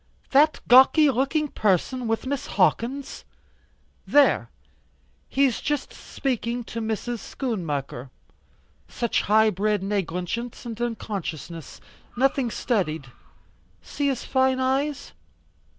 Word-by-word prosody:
That 295 +3 +4
gawky 265 +4 +7
looking 275 +5 0
person, 225 +5 0
with 225 +2 -1
Miss 275 0 -3
Hawkins?" 235 +8 0 0.8
"There. 290 0 +4 0.8
He's 270 -3 +2
just 295 -2 -2
speaking 240 -2 -3
to 230 0 -6
Mrs. 225 +2 -3
Schoonmaker. 150 - -4 0.8
Such 235 -2 -1
high 215 +1 +4
bred 205 +1 0
negligence 195 +5 -3
and 230 -1 -6
unconsciousness. 175 - -5 0.4
Nothing 270 -1 +2
studied. 160 - -2 0.7
See 285 0 -2
his 265 -3 -1
fine 260 -1 +2
eyes." 270 +2 -1
235 Hz, 100 wpm, -24 LUFS, 205-265 Hz, 0.8 s, gawky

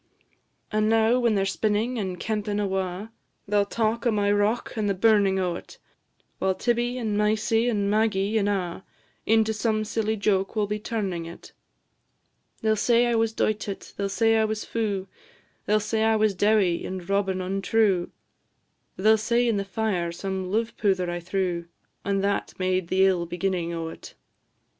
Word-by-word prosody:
"And 215 0 +1
now, 225 +2 +3
when 235 -3 +2
they 195 - +2
're - - 0
spinnin' 215 +4 0
and 190 -5 -3
kempin' 210 0 -2
awa', 190 +1 -2 0.4
They 210 - -1
'll 205 -1 +4
talk 230 +2 0
o' - - +3
my 205 -1 +1
rock 205 +3 0
and 215 -2 0
the 200 - 0
burnin' 200 -1 +3
o't, 180 -2 -3 0.6
While 190 0 +1
Tibbie, 240 +2 0
and 220 -4 -2
Mysie, 215 +2 +2
and 205 -3 0
Maggie, 215 0 +1
and 205 0 +1
a', 185 -2 -2 0.4
Into 220 0 +3
some 215 0 0
silly 220 0 -1
joke 195 -1 0
will 210 -1 +1
be 210 +1 -3
turnin' 195 -7 -3
it: 170 - -11 1.1
They 220 - +3
'll - - +3
say 235 +3 +3
I 240 - +1
was 225 -1 +2
doited, 215 -2 -2
they 200 - -2
'll - - -2
say 225 +3 +3
I 220 - +3
was 215 0 -3
fu'; 205 -4 -2 0.6
They 210 - +3
'll - - +4
say 220 +1 -1
I 220 0 +3
was 215 -1 +2
dowie, 200 -3 +2
and 185 -2 -6
Robin 195 -1 0
untrue; 195 0 +1 0.9
They 215 +4 +4
'll - - +3
say 235 +2 +1
in 225 -3 +1
the 200 - -1
fire 195 -4 -1
some 190 +1 -4
luve 225 +3 -1
powther 185 -4 +1
I 175 - -3
threw, 175 -1 -2 0.4
And 195 0 0
that 200 0 -1
made 185 -1 0
the 190 +2 +3
ill 180 -3 +1
beginning 175 -1 -2
o't. 165 -1 -7
205 Hz, 180 wpm, -25 LUFS, 190-220 Hz, 1.1 s, ll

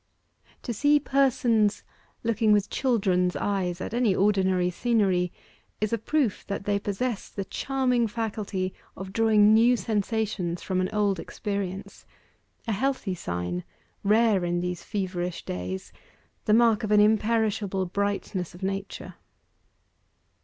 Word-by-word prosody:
To 240 - -3
see 290 +6 +4
persons 245 -7 +2 0.4
looking 225 -1 +2
with 205 -1 +2
children's 195 -8 +1
eyes 185 -3 -1
at 200 - -5
any 235 -5 +2
ordinary 190 -3 +2
scenery, 190 -5 +1 0.5
is 215 +1 -1
a 230 - +1
proof 265 -2 0
that 200 0 -4
they 205 0 +1
possess 205 +3 -3
the 195 - -5
charming 250 0 0
faculty 205 -4 -3 0.2
of 190 0 -7
drawing 215 -2 +5
new 235 +3 +5
sensations 205 -4 -2
from 185 -1 0
an 185 - -1
old 205 -3 +1
experience 200 0 -5 0.6
a - - 0
healthy 220 -2 -1
sign, 90 - -4 0.4
rare 215 -2 +3
in 175 0 0
these 180 0 -3
feverish 180 -3 -3
days 90 +1 -5 0.5
the 210 - +3
mark 225 -2 +4
of 215 - -2
an 210 0 +5
imperishable 215 -2 +2
brightness 190 -1 -2
of 180 - -11
nature. 195 +1 -4
205 Hz, 130 wpm, -26 LUFS, 185-225 Hz, 0.6 s, drawing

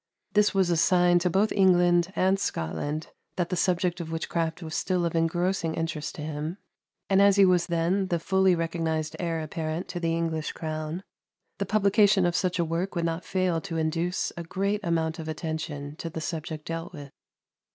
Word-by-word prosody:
This 210 0 +4
was 190 -3 +2
a 170 - +2
sign 175 +1 +4
to 180 +1 +1
both 195 +5 +2
England 175 -2 +4
and 190 +1 +2
Scotland 145 - -3 0.3
that 175 -2 -1
the - - -1
subject 180 0 +1
of 160 -1 -6
witchcraft 165 +1 -2
was 160 -1 -6
still 180 0 0
of 170 - -1
engrossing 170 0 0
interest 165 -2 -3
to 150 - -6
him; 155 +3 -4 0.5
and 195 0 +4
as 200 -1 +6
he 200 -1 +7
was 180 -2 +3
then 175 +3 +1
the 175 - 0
fully 190 +2 +3
recognized 165 -2 -2
heir 165 -2 -1
apparent 155 +2 -4
to 175 - -4
the 165 -1 0
English 160 -2 -2
crown, 155 +2 -4 0.6
the - - -1
publication 205 -2 +4
of 175 0 +1
such 185 -1 0
a 170 - +1
work 170 +4 -2
would 170 -1 0
not 165 +1 -2
fail 185 -3 0
to 165 - -4
induce 165 +3 -1
a 170 - -5
great 195 +5 -1
amount 165 -2 0
of 160 - -6
attention 155 -2 -4
to 165 - -5
the 160 - -5
subject 155 -1 -5
dealt 165 0 -4
with. 145 -4 -9
170 Hz, 190 wpm, -27 LUFS, 160-185 Hz, 0.6 s, he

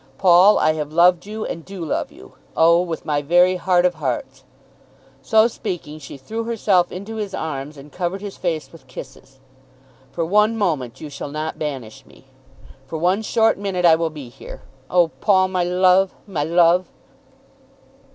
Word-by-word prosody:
Paul, 185 +2 +6
I 155 - +2
have 150 -1 -5
loved 175 +3 +3
you, 215 +1 -5
and 165 - -6
do 185 -2 -7
love - - -2
you, - - -15 0.2
oh, 170 +1 +5
with 170 -3 -5
my 145 -1 0
very 175 +5 +3
heart 180 -1 +2
of 180 - +2
hearts." 130 -3 -4 0.8
So 220 - +4
speaking 155 -9 -6
she 140 -1 -10
threw 220 +12 -5
herself 205 -6 +1
into 200 +5 -7
his 205 -3 -4
arms 150 -1 -5
and 140 +1 -13
covered 180 +2 -3
his 205 -1 -7
face 165 -4 -3
with 160 -6 -16
kisses. 135 +1 -12 0.7
"For 165 - -2
one 210 +5 +2
moment 150 - -2
you 150 - -8
shall 140 - -7
not 155 +2 -5
banish 135 -8 -6
me. - - -20 0.6
For 160 - -5
one 180 +6 +1
short 225 -1 +1
minute 190 -3 -1
I 165 - +7
will 165 0 +1
be 150 -5 -10
here. 120 - -12 0.3
Oh, 175 -2 +3
Paul, 190 -3 +3
my 185 -1 0
love; 185 +1 +3
my 165 -8 -3
love!" 170 +2 +3
175 Hz, 170 wpm, -21 LUFS, 155-190 Hz, 0.8 s, I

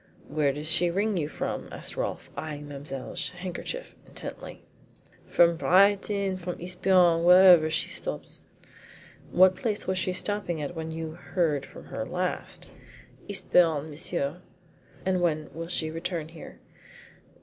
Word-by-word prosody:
"Where 145 -1 +1
does 150 +3 -4
she 170 +2 +3
ring 200 +4 0
you 155 -5 0
up - - -13
from?" - - -3
asked - - -7
Rolfe, - - -4
eyeing 150 0 -6
Mademoiselle 140 -1 -6
Chiron's - - -2
handkerchief 185 - -6
intently. - - -8 0.6
"From 170 -1 +4
Brighton 200 +1 +3
from 180 -1 -5
Eastbourne 180 -1 +3
wherever 180 -2 +8
she 160 - 0
stops." - - -6 0.9
"What 185 +1 +6
place 215 -3 -2
was 185 0 0
she 185 - 0
stopping 185 -3 -2
at 150 +3 -4
when 160 0 -4
you 160 0 -5
heard 160 -4 -1
from - - -12
her - - -4
last?" - - -3 0.6
"Eastbourne, 160 -3 +2
monsieur." 150 +1 -3 0.6
"And 185 -1 +1
when 155 -4 0
will 165 +2 -5
she 160 -2 -1
return 165 -1 -4
here?" 165 -1 -11
170 Hz, 140 wpm, -27 LUFS, 155-185 Hz, 0.9 s, wherever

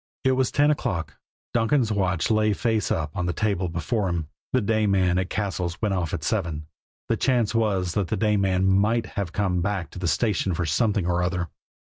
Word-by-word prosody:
It 130 - +3
was 130 -1 +2
ten 145 +1 +3
o'clock 100 - -2 0.4
Donkin's 115 0 +2
watch 95 -2 0
lay 110 -1 +3
face 110 0 0
up 75 -2 -2
on 90 - -1
the 90 - 0
table 95 -4 0
before 90 +5 -1
him 85 -2 -2 0.3
the 130 - +3
day 110 -1 +1
man 90 -2 +2
at 95 0 -2
Cassil's 95 -3 -2
went 105 -3 0
off 90 -4 -1
at - - -3
seven 80 -2 -1 0.4
the - - +2
chance 120 -5 +1
was 100 -6 +1
that 100 -4 0
the - - -1
day 105 -1 +2
man 95 -2 +2
might 105 +5 +3
have 100 -5 -4
come 90 -2 0
back 95 -2 -2
to - - -8
the 90 - -1
station 100 -2 +1
for 85 - -1
something 100 +4 +1
or 90 0 +1
other! 90 -1 -1
95 Hz, 210 wpm, -25 LUFS, 90-110 Hz, 0.4 s, It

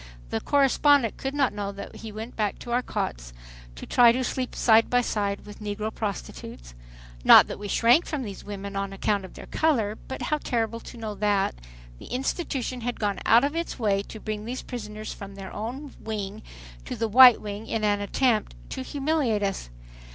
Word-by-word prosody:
The 110 - -1
correspondent 280 -3 +3
could 270 +1 -4
not 275 -5 +2
know 205 -1 -3
that 200 - -9
we 220 - -7
went 220 +3 -7
back 210 -2 -1
to 240 - -8
our 245 +1 +2
cots - - -4 0.4
to - - -8
try 240 -1 +6
to 255 +2 -1
sleep 255 0 -3
side 225 -1 +4
by 245 0 +3
side 200 -4 -2
with 210 - -11
negro 210 +1 -3
prostitutes. 175 - -6 0.5
Not - - +9
that - - -7
we 205 - -5
shrank 240 - +4
from 295 -4 -3
these 200 -4 -7
women 200 -1 -7
on 195 0 -3
account 200 0 0
of 185 - -13
their - - -9
color, 240 -10 +1
but 265 - -5
how 300 - 0
terrible 230 -3 -1
to 235 - -11
know 220 -2 -5
that, 205 -1 +1 0.5
the - - -11
institution 255 -1 -2
had 245 +1 -3
gone 205 -3 -1
out 230 +3 +6
of 290 +3 0
its 335 0 -3
way 205 -5 +1
to 220 - -9
bring 215 0 -5
these 250 +3 -5
prisoners 215 -3 -6
from 200 -1 -10
their 195 -1 -8
own 255 +7 -6
wing 210 -1 -5 0.4
to - - -5
the 225 - -1
white 250 +2 +9
wing 210 +1 -6
in 220 - -2
an 205 -1 +2
attempt 215 - +1 0.2
to - - -4
humiliate 275 - 0
us. 195 - -2
220 Hz, 195 wpm, -26 LUFS, 205-250 Hz, 0.5 s, Not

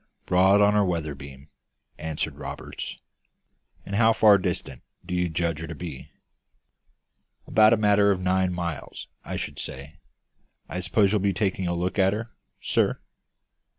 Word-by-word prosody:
"Broad 95 +3 +4
on 105 0 +5
our 105 -1 +4
weather 85 -5 -2
beam," 70 +1 -12 0.5
answered 80 -1 -3
Roberts. - - -7 0.9
"And 100 - -7
how 115 0 +5
far 105 -2 +6
distant 65 -7 -4 0.2
do - - -5
you 90 -1 0
judge 85 -1 -1
her 80 - -6
to - - -7
be?" 80 -7 -8 1.4
"About 110 0 +5
a - - +3
matter 105 -1 +4
of 95 -2 +2
nine 95 0 +1
miles, 85 -3 -5
I - - -5
should - - -5
say. 70 +5 -6 0.7
I 90 - -4
suppose 95 +2 +2
you'll 105 - +2
be 100 0 +1
taking 95 -1 -1
a 85 - -1
look 90 +3 -2
at 95 +1 +4
her, 115 +2 -5 0.3
sir?" - - +1
90 Hz, 155 wpm, -25 LUFS, 80-100 Hz, 1.4 s, far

